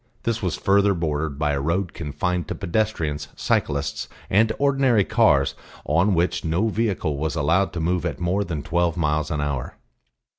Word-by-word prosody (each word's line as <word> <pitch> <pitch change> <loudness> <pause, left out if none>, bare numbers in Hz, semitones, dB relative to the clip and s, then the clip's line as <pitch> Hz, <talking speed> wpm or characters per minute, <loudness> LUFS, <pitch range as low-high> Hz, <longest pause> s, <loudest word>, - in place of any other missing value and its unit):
This 115 0 -1
was 90 -5 -1
further 100 0 +3
bordered 75 -3 -2
by 75 0 +1
a 70 -1 -1
road 85 +4 -1
confined 85 +2 -2
to - - -4
pedestrians, 85 -7 -1
cyclists 70 0 -1 0.2
and 110 +3 +4
ordinary 135 -6 +3
cars 95 - +3 0.3
on 90 +7 +2
which 85 +2 0
no 85 +7 +1
vehicle 100 -9 -1
was 80 +1 -2
allowed 85 +6 +2
to 85 - -3
move 85 +1 0
at 85 -6 -3
more 90 +4 0
than 80 -6 -4
twelve 85 0 0
miles 75 -1 0
an 75 -2 -1
hour. 70 -4 -3
85 Hz, 170 wpm, -23 LUFS, 75-100 Hz, 0.3 s, and